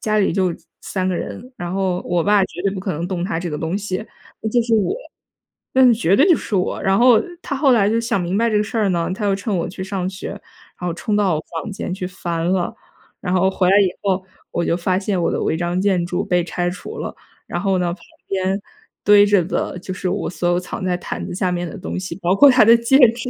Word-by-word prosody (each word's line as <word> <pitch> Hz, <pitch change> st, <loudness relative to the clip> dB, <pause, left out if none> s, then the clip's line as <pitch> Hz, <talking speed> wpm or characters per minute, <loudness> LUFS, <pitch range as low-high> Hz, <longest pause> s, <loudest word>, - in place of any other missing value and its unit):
家 215 Hz, -1 st, +1 dB
里 200 Hz, -, +2 dB
就 185 Hz, -3 st, +1 dB, 0.3 s
3 185 Hz, -1 st, -2 dB
个 185 Hz, -, 0 dB
人， 250 Hz, +3 st, -6 dB
然 175 Hz, 0 st, -5 dB
后 190 Hz, -2 st, 0 dB
我 175 Hz, -1 st, 0 dB
爸 205 Hz, -1 st, +4 dB
绝 175 Hz, -, -9 dB
对 195 Hz, -, +1 dB
不 190 Hz, -, -4 dB
可 190 Hz, -1 st, -2 dB
能 165 Hz, +3 st, -3 dB
动 180 Hz, -2 st, -3 dB
她 190 Hz, -4 st, -2 dB
这 175 Hz, -, -3 dB
个 150 Hz, -, -3 dB
东 165 Hz, +5 st, -2 dB
西， 190 Hz, -2 st, -3 dB, 0.4 s
嗯， 220 Hz, -, -1 dB
就 240 Hz, +2 st, +3 dB
是 230 Hz, -1 st, +1 dB
我， 215 Hz, -, +1 dB, 0.8 s
呃， 255 Hz, -2 st, +6 dB
绝 200 Hz, -4 st, +2 dB
对 290 Hz, -, +5 dB
就 340 Hz, -, +7 dB
是 205 Hz, -, -3 dB
我。 180 Hz, -, -1 dB
然 195 Hz, 0 st, +2 dB
后 240 Hz, -2 st, +6 dB, 0.2 s
她 280 Hz, -, -3 dB
后 270 Hz, -1 st, +3 dB
来 210 Hz, -4 st, +4 dB
就 230 Hz, +1 st, +2 dB
想 230 Hz, -5 st, 0 dB
明 180 Hz, +3 st, -1 dB
白 230 Hz, +1 st, +2 dB
这 210 Hz, -, +2 dB
个 210 Hz, -, +2 dB
事 220 Hz, +2 st, -4 dB
儿 205 Hz, -3 st, +2 dB
呢， 170 Hz, -1 st, 0 dB
她 210 Hz, +2 st, -3 dB
又 195 Hz, -1 st, +2 dB
趁 200 Hz, +1 st, -2 dB
我 170 Hz, -, -1 dB
去 190 Hz, +1 st, -6 dB
上 190 Hz, -1 st, -3 dB
学， 190 Hz, -, -7 dB
然 200 Hz, -, -14 dB
后 170 Hz, -, -1 dB
冲 205 Hz, +4 st, -2 dB
到 195 Hz, -6 st, +2 dB
我 155 Hz, -, -3 dB, 0.2 s
房 215 Hz, -, -7 dB
间 190 Hz, -2 st, -4 dB
去 185 Hz, -1 st, -4 dB
翻 170 Hz, -2 st, -3 dB
了， 185 Hz, -2 st, 0 dB, 0.5 s
然 180 Hz, -1 st, -2 dB
后 190 Hz, +1 st, +3 dB
回 185 Hz, -1 st, +2 dB
来 195 Hz, -, +6 dB
以 190 Hz, -2 st, +4 dB
后， 190 Hz, -1 st, 0 dB, 0.3 s
我 170 Hz, -, -1 dB
就 -, -, +1 dB
发 185 Hz, +1 st, 0 dB
现 190 Hz, -2 st, -1 dB
我 -, -, +1 dB
的 -, -, -1 dB
违 -, -, 0 dB
章 175 Hz, +1 st, -1 dB
建 190 Hz, -3 st, +2 dB
筑 180 Hz, +2 st, -2 dB
被 180 Hz, -1 st, +1 dB
拆 175 Hz, 0 st, -2 dB
除 190 Hz, -, -8 dB
了， -, -, -5 dB, 0.3 s
然 -, -, -3 dB
后 195 Hz, -2 st, +1 dB
呢， 175 Hz, -1 st, 0 dB
旁 -, -, -12 dB, 0.3 s
边 190 Hz, +1 st, 0 dB, 0.4 s
堆 205 Hz, 0 st, +7 dB
着 200 Hz, -4 st, +4 dB
的 180 Hz, +1 st, -2 dB
就 185 Hz, +1 st, -6 dB
是 185 Hz, 0 st, -3 dB
我 200 Hz, -1 st, -2 dB
所 175 Hz, 0 st, -1 dB
有 175 Hz, 0 st, +2 dB
藏 180 Hz, +1 st, -6 dB
在 180 Hz, -1 st, +1 dB
毯 -, -, -5 dB
子 -, -, -5 dB
下 185 Hz, -2 st, 0 dB
面 175 Hz, -1 st, -2 dB
的 -, -, -8 dB
东 185 Hz, -, -4 dB
西， 185 Hz, -, -6 dB
包 180 Hz, +2 st, +2 dB
括 285 Hz, +6 st, +8 dB
她 250 Hz, -3 st, +6 dB
的 230 Hz, -, +8 dB
戒 235 Hz, +4 st, +4 dB
指。 235 Hz, +2 st, -6 dB
190 Hz, 280 characters per minute, -20 LUFS, 180-210 Hz, 0.8 s, 括